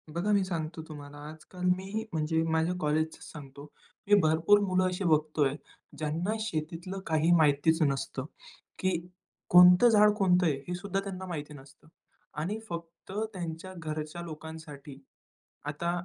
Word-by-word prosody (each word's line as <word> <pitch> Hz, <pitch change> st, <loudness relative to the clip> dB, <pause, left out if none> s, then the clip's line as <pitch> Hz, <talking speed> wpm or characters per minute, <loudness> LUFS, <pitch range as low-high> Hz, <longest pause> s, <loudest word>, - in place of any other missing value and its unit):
बघा 185 Hz, +5 st, 0 dB
मी 200 Hz, -2 st, +3 dB
सांगतो 165 Hz, -2 st, -4 dB
तुम्हाला, 145 Hz, -2 st, -10 dB
आजकाल 160 Hz, +4 st, -11 dB
मी 195 Hz, +4 st, -4 dB
म्हणजे 160 Hz, 0 st, 0 dB
माझ्या 160 Hz, +2 st, +1 dB
कॉलेजच 155 Hz, +1 st, 0 dB
सांगतो. 140 Hz, -1 st, -10 dB, 0.4 s
मी 205 Hz, -, +6 dB
भरपूर 160 Hz, +6 st, +4 dB
मुलं 185 Hz, -2 st, +1 dB
अशी 185 Hz, +1 st, -2 dB
बघत 155 Hz, -2 st, +1 dB
आहे, 135 Hz, +1 st, 0 dB, 0.4 s
ज्यांना 160 Hz, +7 st, -1 dB
शेतीतलं 175 Hz, -1 st, -4 dB
काही 160 Hz, +1 st, +2 dB
माहितीच 155 Hz, +2 st, +3 dB
नसतं. 135 Hz, -2 st, -1 dB, 0.5 s
की 185 Hz, -, +1 dB, 0.6 s
कोणतं 180 Hz, +6 st, +8 dB
झाड 210 Hz, -1 st, +6 dB
कोणतं 180 Hz, -3 st, +3 dB
आहे 155 Hz, -4 st, +2 dB
हे 175 Hz, -, -3 dB
सुद्धा 195 Hz, +1 st, -3 dB
त्यांना 190 Hz, -1 st, -6 dB
माहिती 150 Hz, -5 st, -6 dB
नसतं 135 Hz, 0 st, -15 dB, 0.5 s
आणि 185 Hz, +8 st, -2 dB
फक्त 170 Hz, +1 st, -8 dB, 0.2 s
त्यांच्या 175 Hz, 0 st, -6 dB
घरच्या 155 Hz, 0 st, -5 dB
लोकांसाठी, 155 Hz, -4 st, -9 dB, 0.7 s
आता 150 Hz, +4 st, -2 dB
165 Hz, 140 wpm, -29 LUFS, 155-185 Hz, 0.7 s, कोणतं